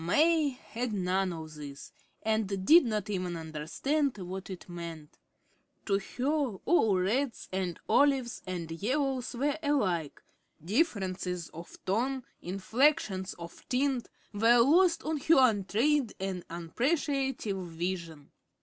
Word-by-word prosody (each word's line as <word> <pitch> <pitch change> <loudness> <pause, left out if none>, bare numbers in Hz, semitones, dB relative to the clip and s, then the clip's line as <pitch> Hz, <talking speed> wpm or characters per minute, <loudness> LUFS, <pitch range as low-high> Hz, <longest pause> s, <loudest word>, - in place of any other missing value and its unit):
May 310 - +3
had 250 -2 -5
none 190 -1 0
of 160 -2 -7
this, 145 -2 -9 0.3
and 205 -3 0
did 330 - +8
not 215 -4 -1
even 180 -4 -2
understand 165 - -1
what 190 +1 -6
it 185 -2 -8
meant. 170 -3 -8 0.7
To 195 -2 +2
her 265 +1 -1
all 220 - +4
reds 235 +8 0
and 185 -2 -2
olives 270 -4 +3
and 175 -3 -4
yellows 255 - -1
were 285 +5 0
alike; 190 - 0 0.4
differences 185 - -1
of 170 +2 -11
tone, 250 +7 0 0.2
inflections 195 - +1
of 170 0 -10
tint, 260 -1 0 0.2
were 230 +4 +5
lost 330 +8 +5
on 315 0 -1
her 320 +4 +4
untrained 240 +3 +3
and 190 -2 -3
unappreciative 245 - -1
vision. 170 -3 -5
205 Hz, 120 wpm, -30 LUFS, 180-270 Hz, 0.7 s, did